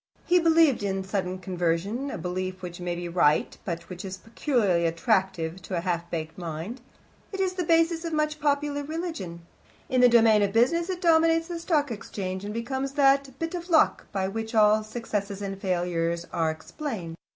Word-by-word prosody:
He 360 0 +4
believed 325 -6 +4
in 195 -1 -1
sudden 190 -1 -2
conversion, 185 +8 -1
a 220 - -4
belief 185 +2 -4
which 175 -1 -6
may 175 -1 -2
be 175 0 -5
right, 170 -3 +2
but 170 -2 -5
which 180 -1 -8
is 190 -1 -6
peculiarly 215 - +1
attractive 185 -1 0
to 185 - -4
a - - -1
half 170 -1 -2
baked 160 0 -5
mind. 170 +9 -5 0.5
It 390 - -5
is 375 -1 +1
the 365 -1 -2
bias 330 0 +2
of 335 - -3
much 305 0 0
popular 290 0 0
religion: 285 - -5 0.4
in 255 -1 +3
the 250 - +8
domain 225 -3 +5
of 200 -1 +1
business 335 +10 +3
it 365 -1 -3
dominates 330 -1 +4
the 345 -1 -4
Stock 305 -5 +1
Exchange, 190 -3 -5
and 205 - -4
becomes 265 +4 -3
that 275 -2 +3
"bit 330 +3 -3
of 350 0 -5
luck" 320 -2 +3
by 190 -1 -1
which 225 +3 -4
all 215 0 +5
successes 215 -3 -4
and 195 -1 -5
failures 170 -2 -1
are 165 -1 +1
explained. 170 - -5
210 Hz, 185 wpm, -26 LUFS, 180-295 Hz, 0.5 s, the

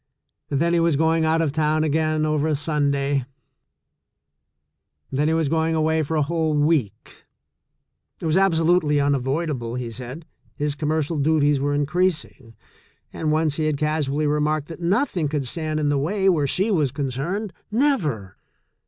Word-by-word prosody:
Then 165 +5 +1
he 170 - +3
was 165 -2 +2
going 160 +2 +2
out 160 +1 +2
of 150 - 0
town 155 +1 +1
again, 155 0 +1
over 155 0 +1
Sunday. 140 -2 0 1.9
Then 145 +3 +1
he 160 - +2
was 165 -2 +1
going 160 +2 +1
away 160 0 +1
for 155 +1 -2
a 150 - +3
whole 160 0 0
week 145 - -1 0.4
— - - -54
it - - -6
was 160 0 +1
absolutely 165 -5 +3
unavoidable, 140 -2 -1
he 125 -2 -4
said, 125 +7 -7 0.3
his 145 0 -1
com 150 +1 -3
mercial 155 -1 0
duties 145 -2 +3
were 145 +1 0
increasing 145 -6 -1 0.3
— - - -38
and 155 -1 -1
once 155 -1 +1
he 155 - 0
had 155 -2 0
cas 150 0 0
ually 145 +2 0
remarked 150 +1 0
that 165 - -8
nothing 180 - +1
could 145 -2 -2
stand 155 +3 -3
in 150 -1 +1
the 145 -1 +1
way 190 +7 0
where 155 -7 +3
she 195 +10 0
was 150 -9 +1
concerned 155 - -3
— - - -48
never 165 - 0
155 Hz, 170 wpm, -23 LUFS, 145-160 Hz, 1.9 s, he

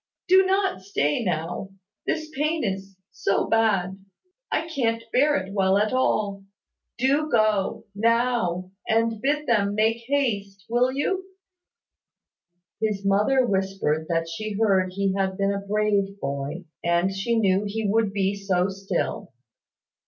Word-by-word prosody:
Do 375 +1 +6
not 385 - +1
stay 190 -1 0
now, 175 +1 -2 0.4
this 310 -1 -2
pain 305 +3 0
is 195 -1 -3 0.2
so 180 +2 0
bad, 195 -4 +1 0.5
I 325 - 0
can't 230 -7 -1
bear 290 +3 +4
it 190 +1 -5
well 190 -1 +3
at 210 +3 +1
all. 205 -6 0 0.5
Do 280 +5 +2
go, 215 -5 +1
now, 225 -5 +1 0.2
and 225 -1 +1
bid 300 +2 0
them 205 -5 +2
make 220 +2 +2
haste, 205 -9 -1
will 245 +2 +2
you?" 375 +8 -1 1.6
His 210 -3 -1
mother 210 +7 +3
whispered 190 -7 -1
that 165 -1 0
she 210 +6 -4
heard 195 -3 +2
he 195 0 0
had 190 -1 -1
been 200 0 +1
a 200 - -2
brave 200 -1 0
boy, 140 +5 -4 0.2
and 170 +3 +2
she 195 +5 -1
knew 195 -2 +2
he 215 +1 -2
would 215 0 +2
be 195 -1 0
so 195 -2 0
still. 195 -1 -3
200 Hz, 140 wpm, -25 LUFS, 190-235 Hz, 1.6 s, Do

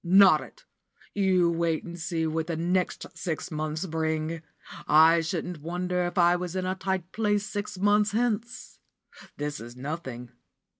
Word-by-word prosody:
"Not 185 -3 +6
it! - - -14 0.5
You 185 -4 +3
wait 165 -1 0
and 175 0 -8
see 165 0 -1
what 160 0 -1
the 170 - -2
next 180 +2 0
six 170 +1 -4
months 155 +2 -2
bring! 160 -1 -2 0.5
I 160 +2 +6
shouldn't 170 -1 -4
wonder 180 +2 -1
if 175 - -4
I 175 0 +5
was 180 0 -4
in 185 -1 -1
a 185 - 0
tight 190 -1 -3
place 210 -2 0
six 205 -2 -5
months 205 +2 +3
hence. 235 +1 -2 0.6
This 145 0 -3
is 120 +1 -9
nothing. 130 -3 -6
175 Hz, 155 wpm, -27 LUFS, 160-190 Hz, 0.6 s, Not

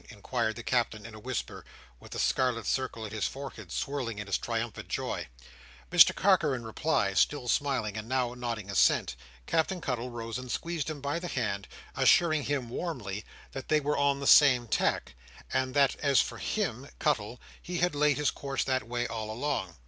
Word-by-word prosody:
inquired 110 - -2
the 120 - -7
Captain 115 -4 0
in 115 - -9
a 110 - -10
whisper, 125 +1 -4 0.4
with - - -14
the - - -5
scarlet 125 -3 +1
circle 130 -4 -1
on 110 - -6
his 110 -2 -1
forehead 130 -9 -8
swelling 130 -6 -3
in 105 - -4
his 100 - 0
triumphant - - -3
joy. - - -3 0.6
Mr - - +8
Carker, 175 -8 +3
in 120 - -6
reply, 110 -3 0
still 125 +6 +2
smiling, 130 -6 0
and 110 +1 -6
now 125 -2 0
nodding 115 -5 -4
assent, 100 - +3 0.3
Captain 165 - 0
Cuttle 125 -5 -3
rose 115 0 -5
and 125 -1 -7
squeezed 165 -3 -2
him 150 -3 -5
by 145 +4 -1
the 175 - -5
hand, 105 - -2 0.3
assuring 155 -4 +4
him, 140 -4 -1
warmly, 115 - -4 0.3
that 135 - -7
they 155 - +3
were 150 0 0
on 140 -1 +2
the 140 - -4
same 130 -6 +7
tack, - - 0 0.4
and 130 0 0
that 140 -2 +4
as 140 -3 +3
for - - -1
him 140 - -2
(Cuttle) 120 -5 0 0.2
he 175 0 -4
had 175 0 +2
laid 145 -1 +3
his 150 -1 +2
course 135 -1 -2
that 130 -3 -1
way 120 0 -1
all 110 -2 -4
along. 110 - -2
130 Hz, 185 wpm, -29 LUFS, 115-145 Hz, 0.6 s, Mr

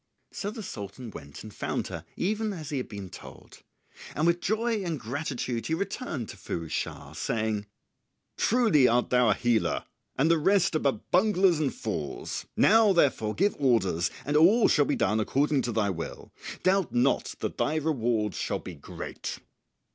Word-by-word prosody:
So 200 - -4
the 220 0 -7
Sultan 110 - -7
went 70 -6 -10
and 110 -1 -10
found - - -3
her - - -7
even 215 +3 -1
as 155 -5 -7
he 145 - -1
had 125 - -4
been 100 -3 -7
told; - - -12 0.5
and 155 - +1
with 170 0 +3
joy 220 0 0
and 165 -5 -2
gratitude 125 -1 -3
he 160 - +1
returned 170 - -4
to - - -9
Firouz 85 -3 -5
Schah, - - -4
saying, 110 -2 -2 0.7
"Truly 220 - +4
thou 120 - +4 0.3
art 105 - +3
a - - -17
healer 120 -2 +1 0.3
and 150 +5 +3
the 165 - +4
rest 190 +1 +3
are - - +3
but 135 -8 -2
bunglers 185 -3 +4
and 145 -4 +1
fools. 80 -10 -4
Now, 220 -1 +6
therefore, 120 -10 +2
give 200 +4 +2
orders 95 - +2 0.2
and 145 - -1
all 190 +10 +6
shall 145 - +4
be - - 0
done 105 +3 +1
according 140 +5 +1
to 120 - -2
thy 105 -3 +1
will. 85 -2 -7 0.3
Doubt 190 -1 +2
not 125 +3 +2
that - - -4
thy 155 - +1
reward 120 -9 0
shall - - -2
be - - -8
great." - - -7
140 Hz, 175 wpm, -28 LUFS, 110-185 Hz, 0.7 s, Now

